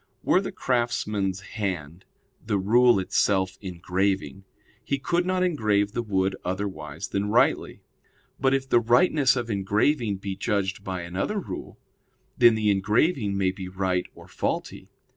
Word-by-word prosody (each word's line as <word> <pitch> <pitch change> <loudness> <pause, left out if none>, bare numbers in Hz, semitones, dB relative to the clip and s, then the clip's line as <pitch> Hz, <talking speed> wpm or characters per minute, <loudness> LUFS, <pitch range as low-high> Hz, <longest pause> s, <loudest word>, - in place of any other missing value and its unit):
Were 185 - +3
the 195 - -5
craftsman's 105 - -1
hand 95 -5 -5 0.4
the 105 -2 0
rule 120 +4 +4
itself 95 0 +1
engraving, 95 +1 -2 0.4
he 140 - -1
could 175 +6 0
not 185 0 +1
engrave 105 - +1
the 120 - -2
wood 95 -3 0
otherwise 90 -3 -4
than 100 +1 -1
rightly; 115 +3 +1 0.6
but 135 0 +2
if 135 0 -2
the 120 - +4
rightness 130 +4 +3
of 120 -2 -3
engraving 105 +3 +1
be 95 0 -5
judged 100 0 -2
by 95 -2 -4
another 90 - -3
rule, - - -7 0.6
then 120 -2 +6
the 105 -1 +2
engraving 105 - +1
may 95 -1 +2
be 95 -1 -7
right 90 -1 -1
or - - -14
faulty. - - -4
100 Hz, 140 wpm, -25 LUFS, 95-120 Hz, 0.6 s, then